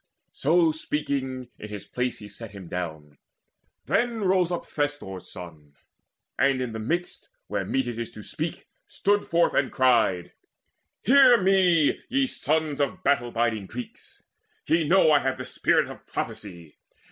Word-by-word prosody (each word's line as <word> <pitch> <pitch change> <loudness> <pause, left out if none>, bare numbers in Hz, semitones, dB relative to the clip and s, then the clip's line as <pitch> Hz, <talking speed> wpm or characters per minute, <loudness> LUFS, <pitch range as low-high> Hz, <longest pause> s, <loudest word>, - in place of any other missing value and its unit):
So 165 +2 +3
speaking, 135 -5 -3
in 105 - -8
his 105 -1 -7
place 125 +2 -2
he 105 - -10
sat 105 +1 -10
him 95 -3 -9
down; 80 -5 -6 0.7
Then 235 -2 0
rose 185 -2 +2
up 175 - -3
Thestor's 145 - -4
son, 80 -5 -11 0.6
and 135 -1 +3
in 125 -2 -2
the 110 - -4
midst, 170 +11 -3 0.2
Where - - -3
meet 135 -1 0
it 120 -1 -5
is 115 0 -4
to 105 - -10
speak, - - -5 0.2
stood 205 +1 +1
forth 170 +1 +2
and 135 - +1
cried: 115 -9 +2 0.7
"Hear 260 +1 +7
me, 185 -5 +3
ye 270 +2 +2
sons 155 - -1
of 185 +6 -2
battle 130 -4 +2
biding 115 -4 -1
Greeks: 120 +2 -9 0.4
Ye 165 -1 +2
know 175 -2 +5
I 145 - +6
have 135 -1 -1
the - - -6
spirit - - +2
of - - -11
prophecy. 85 -6 -6
135 Hz, 155 wpm, -26 LUFS, 105-170 Hz, 0.7 s, Hear